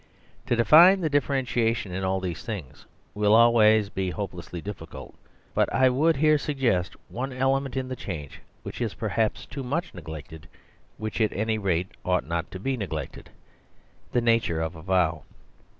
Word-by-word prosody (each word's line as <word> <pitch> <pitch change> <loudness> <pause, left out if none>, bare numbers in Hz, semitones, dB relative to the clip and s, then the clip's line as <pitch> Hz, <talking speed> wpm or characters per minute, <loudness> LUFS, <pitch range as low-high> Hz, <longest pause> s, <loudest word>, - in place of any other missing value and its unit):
To 120 - +2
define 170 - +7
the 160 -3 -1
differentiation 125 -7 0
in 95 +2 -3
all 95 0 0
these 90 -5 -5
things 100 - -7 0.3
will 105 +1 +3
always 110 -3 +5
be 95 -2 -2
hopelessly 90 -3 -6
difficult. 85 -3 -8 0.4
But - - +1
I 130 +2 +4
would 155 +6 +2
here 155 +1 +3
suggest 120 -12 0
one 130 +3 -4
ele 135 +1 +2
ment 135 -2 -6
in 130 -1 -2
the 130 - -4
change 80 - -7 0.2
which - - -7
is - - -2
perhaps 110 -2 -1
too 140 - -7
much 155 +7 -3
neglected; 80 -2 -9 0.5
which 110 +1 -4
at 110 - +2
any 110 +2 -1
rate 90 -2 -1
ought 90 -1 0
not 85 0 -3
to 95 - -8
be 130 +6 -2
neglected; 100 -7 -6 0.8
the 120 - +2
nature 115 -8 +2
of 80 +1 -3
a 80 - -10
vow. 85 -3 +1
110 Hz, 165 wpm, -26 LUFS, 90-130 Hz, 0.8 s, define